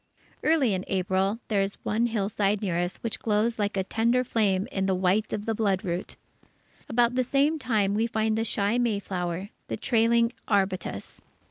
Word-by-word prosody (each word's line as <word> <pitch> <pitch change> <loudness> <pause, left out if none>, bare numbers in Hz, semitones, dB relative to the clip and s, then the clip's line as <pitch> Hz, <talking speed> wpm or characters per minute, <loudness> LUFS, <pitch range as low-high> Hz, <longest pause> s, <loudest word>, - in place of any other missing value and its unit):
Early 300 -9 +3
in 185 -1 -2
April, 190 +2 0
there 205 -3 +1
is 195 +1 -2
one 230 +3 +1
hillside 205 -2 0
near 180 -4 -1
us 175 +1 -2
which 230 - -3
glows 220 +1 0
like 205 -1 -1
a 190 - +1
tender 235 +5 +1
flame 205 -5 +1
with 195 0 0
the 190 - +2
white 190 +4 +1
of 210 - -3
the 225 - 0
bloodroot. 190 -5 -1 0.7
About 240 -1 +3
the 255 0 +2
same 285 +5 +1
time, 210 -7 +1
we 220 +2 +1
find 220 -1 0
the 225 - 0
shy 210 +1 +1
mayflower, 195 -5 -2 0.2
the - - -3
trailing 230 0 +2
arbutus. 195 -3 -1
210 Hz, 170 wpm, -27 LUFS, 195-230 Hz, 0.7 s, Early